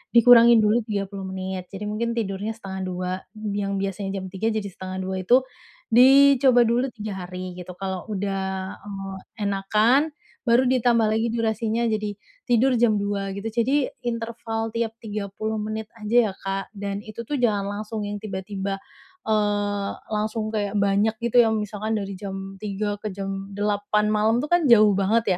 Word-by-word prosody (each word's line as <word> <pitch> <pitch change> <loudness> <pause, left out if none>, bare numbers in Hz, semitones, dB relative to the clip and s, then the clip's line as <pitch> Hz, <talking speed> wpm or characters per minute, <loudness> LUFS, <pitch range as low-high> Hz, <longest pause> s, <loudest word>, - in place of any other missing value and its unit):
dikurangi 235 0 +8
dulu 215 +3 +3
30 200 -1 -3
menit, 190 -1 -5
jadi 200 +1 -6
mungkin 230 +3 -2
tidurnya 205 0 -2
01:30, 185 -3 -4 0.4
yang 200 -1 -1
biasanya 195 0 -3
jam - - -6
03:00, 220 +4 0
jadi 215 -2 -2
01:30 185 0 -5
itu 240 +7 +5 0.6
dicoba 265 0 +7
dulu 235 +3 +2
3 215 -3 -5
hari 185 0 -6
gitu, 180 0 -8
kalau 190 -1 -4
udah, 195 -1 -2 0.4
eee, 195 -1 -6 0.3
enakan, 215 +9 +3 0.4
baru 240 +2 +5
ditambah 240 -3 +3
lagi 225 +1 +1
durasinya 230 0 0
jadi 210 -1 -1 0.4
tidur 250 +2 +4
jam 220 -3 +4
02:00 200 -1 -2
gitu. 200 - -7 0.2
Jadi 270 +3 +2 0.2
interval 230 -1 -3
tiap 230 -1 -2
30 215 +1 -4
menit 215 +1 -4
aja 210 +2 -2 0.2
ya, - - -12
Kak, 195 +2 -4
dan 200 0 -4
itu 215 +2 -7
tuh 290 - -1
jangan 210 -5 +1
langsung 215 0 -5
yang 205 0 -4
tiba-tiba, 195 0 -4 0.5
eee, 205 -1 +1 0.3
langsung 215 +1 -1
kayak 205 -2 -1
banyak, 200 +2 +2
gitu, 235 +1 +1
yang 225 - +2
misalkan 210 +1 -3
dari 200 -1 -5
jam 195 0 -6
03:00 205 0 -2
ke 210 -2 -4
jam 195 0 -5
08:00 205 +1 0
malam, 220 +3 +2
itu 295 - -3
kan 350 -1 +3
jauh 215 -4 +7
banget 215 +4 +2
210 Hz, 155 wpm, -24 LUFS, 195-230 Hz, 0.6 s, dikurangi